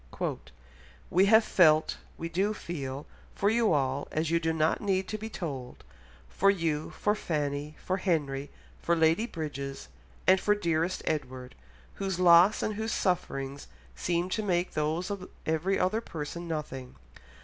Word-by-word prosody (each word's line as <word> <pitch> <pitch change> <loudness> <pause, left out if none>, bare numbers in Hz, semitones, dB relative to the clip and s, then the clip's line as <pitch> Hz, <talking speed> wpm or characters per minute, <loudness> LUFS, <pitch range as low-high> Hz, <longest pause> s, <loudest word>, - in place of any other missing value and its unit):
"We 190 +3 +5
have 220 +2 +7
felt—we 160 -2 +2
do 195 +5 0
feel—for 150 +5 -4
you 230 -1 +3
all 135 -2 0
as 155 +1 -1
you 170 - +3
do 165 -1 0
not 160 0 +1
need 190 -2 0
to 215 - -2
be 220 +1 -5
told; 135 - -6 0.4
for 195 - +2
you, 165 -6 0
for 210 - 0
Fanny, 150 -5 -2
for 185 - 0
Henry, 145 -7 -1 0.3
for 170 - +1
Lady 165 +7 +3
Bridges, 140 - -5 0.4
and 185 0 +6
for 210 - +3
dearest 170 -2 0
Edward, 130 -4 -3 0.5
whose 190 -2 -1
loss 180 +3 +6
and 215 - 0
whose 220 +2 -3
sufferings 140 -7 -1 0.3
seem 170 - 0
to 220 - -1
make 180 -3 0
those 155 +5 -1
of 195 -2 -5 0.2
every 160 +5 +1
other 215 +5 +1
person 170 -2 -6
nothing. 140 -5 -5
170 Hz, 145 wpm, -29 LUFS, 150-190 Hz, 0.5 s, have